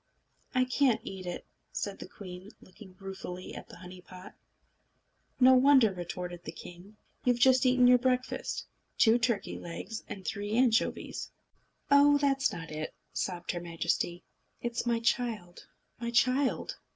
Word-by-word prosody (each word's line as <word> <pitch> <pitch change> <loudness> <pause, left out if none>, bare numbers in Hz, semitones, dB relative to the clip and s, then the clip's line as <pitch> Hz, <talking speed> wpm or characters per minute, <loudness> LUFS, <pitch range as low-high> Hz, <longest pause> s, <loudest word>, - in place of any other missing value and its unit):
"I 255 0 +4
can't 255 -2 +2
eat 185 -2 -7
it," 175 - -5 0.3
said 200 -1 -4
the - - -8
queen, 185 0 -10
looking 185 0 -15
ruefully 190 -2 -7
at - - -9
the - - -11
honey 180 +1 -11
pot. 185 +1 -12 1.1
"No 260 0 +7
wonder!" 260 -5 +6
retorted 175 0 -6
the - - -6
king. 180 +5 -12 0.3
"You've 245 -1 +3
just 260 +1 +5
eaten 250 0 +5
your 250 0 +7
breakfast 255 0 -1 0.3
two 230 +1 +5
turkey 235 -2 -1
eggs, 175 +6 -6
and 190 -2 -7
three 205 0 -3
anchovies." 245 0 +1 0.6
"Oh, 285 +1 +7
that's 275 -1 +2
not 165 -1 -7
it!" 155 0 -5 0.2
sobbed 175 -2 -2
her 175 - -4
Majesty. 170 +1 -2 0.4
"It's 240 0 -3
my 235 -1 +2
child, 225 -7 -2 0.3
my 235 0 -3
child!" 255 +3 +1
220 Hz, 145 wpm, -30 LUFS, 180-250 Hz, 1.1 s, No